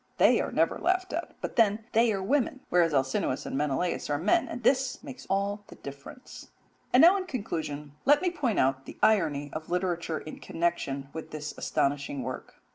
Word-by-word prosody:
They - - +5
are - - -3
never - - +1
laughed 370 -1 0
at, 335 +2 -4
but - - -5
then 220 -1 +3
they 230 0 +4
are 195 -2 -2
women, 265 +3 0
whereas 175 -2 +3
Alcinous 135 -2 0
and - - -4
Menelaus 150 +5 -1
are 145 - +1
men, 210 - +2
and 245 - -6
this 265 +2 +2
makes 265 -3 -10
all 200 +2 0
the - - -12
difference. 140 - -11 0.4
And 250 - +6
now 355 +4 +8
in 375 -1 -4
conclusion 155 - -4
let 290 +2 +5
me 360 -1 0
point 280 - -1
out 135 0 +1
the - - -9
irony 150 -9 +2
of 155 0 -6
literature 175 -2 -1
in 155 - -8
connection 140 -5 -2
with 160 - -7
this 150 -1 -6
astonishing 140 -1 -1
work. 130 +1 -6
180 Hz, 190 wpm, -28 LUFS, -, 0.4 s, now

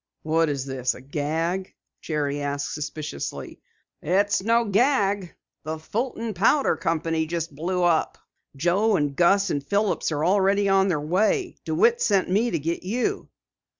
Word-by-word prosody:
"What 160 0 +2
is 140 -2 -2
this, 130 -2 -2
a - - -10
gag?" 160 +7 -2 0.3
Jerry 145 -2 -2
asked 140 0 -3
suspiciously. 150 - -6 0.4
"It's 200 +4 +1
no 230 +3 +2
gag. 205 -4 +1 0.3
The 155 +1 -4
Fulton 230 +6 -3
Powder 225 - +3
Company 165 0 -1
just 165 -1 -3
blew 180 +5 -2
up. 170 -2 +1 0.4
Joe, 190 +9 +2
and 145 -5 0
Gus, 195 +4 +3
and 145 - -2
Philips 200 +3 0
are 150 +1 -1
already 200 +1 +3
on 195 0 +4
their 170 -6 0
way. 210 - 0
DeWitt 470 +1 +2
sent 195 -3 +2
me 220 +5 +2
to 170 - -1
get 165 +3 -3
you." 230 +7 -2
175 Hz, 150 wpm, -24 LUFS, 150-205 Hz, 0.4 s, on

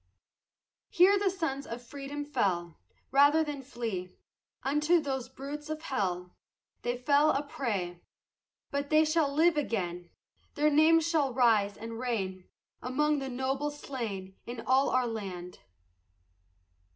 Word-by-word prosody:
Here 385 +3 +5
sons 320 -7 -3
of 230 - -5
freedom 280 +3 -6
fell 175 - -1 0.3
Rather 285 +3 +5
than 295 -2 -5
flee, 230 -8 -4 0.5
Unto 300 +5 +3
those 265 -4 -3
brutes 285 +3 -7
of 310 0 -4
hell 180 - -2 0.5
They 245 +1 -1
fell 285 +4 +4
a 280 0 +1
prey; 195 -11 -3 0.7
But 280 0 -2
they 310 +1 +5
shall 310 -2 +2
live 320 +2 +3
again, 180 -10 -2 0.5
Their 300 0 +3
names 320 +2 +5
shall 290 -7 +1
rise 220 -5 +3
and 225 +1 -7
reign 195 -7 -3 0.3
Among 295 +4 +1
the 270 -1 -4
noble 265 +3 -1
slain 225 -10 -6
In 240 -1 -5
all 260 +4 +3
our 255 -1 +2
land. 190 -6 -6
265 Hz, 125 wpm, -30 LUFS, 225-295 Hz, 0.7 s, Here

